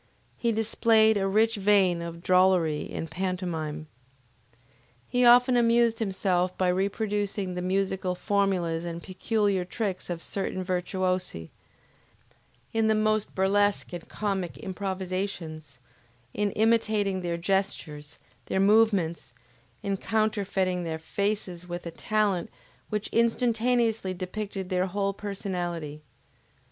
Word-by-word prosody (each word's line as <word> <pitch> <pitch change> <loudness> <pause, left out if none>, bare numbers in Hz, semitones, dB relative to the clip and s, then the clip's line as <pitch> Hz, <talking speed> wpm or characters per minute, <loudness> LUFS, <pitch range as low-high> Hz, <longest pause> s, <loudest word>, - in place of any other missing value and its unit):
He 235 - 0
displayed 220 0 +3
a 195 -1 +1
rich 220 +3 +2
vein 195 -4 +3
of 170 0 -7
drollery 180 -5 +3
in - - -3
pantomime. 165 -3 -3 1.2
He 250 0 +1
often 245 +1 +7
amused 235 -1 +3
himself 185 -3 0
by 185 -1 +2
reproducing 200 0 -1
the 180 - -3
musical 190 0 -1
formulas 180 -4 0
and 170 0 -5
peculiar 200 0 0
tricks 190 0 -4
of 170 -1 -4
certain 190 -1 -3
virtuosi, 185 - -2 1.2
in 225 -1 +2
the 220 - +3
most 215 0 0
burlesque 200 0 +2
and 175 -1 -7
comic 195 -4 -2
improvisations, 185 -6 -4 0.6
in 210 0 0
imitating 215 -3 +2
their 170 -1 -2
gestures, 170 -5 -2 0.3
their 190 - 0
movements, 195 - +2 0.5
in 200 -1 -1
counterfeiting 195 -4 0
their 160 -1 -3
faces 180 +1 -3
with 175 0 -5
a 170 - -4
talent 205 -1 0 0.4
which 210 -1 -2
instantaneously 230 -3 +1
depicted 190 +1 -5
their 185 0 +1
whole 200 +1 -1
personality. 175 -7 -4
190 Hz, 110 wpm, -27 LUFS, 180-215 Hz, 1.2 s, often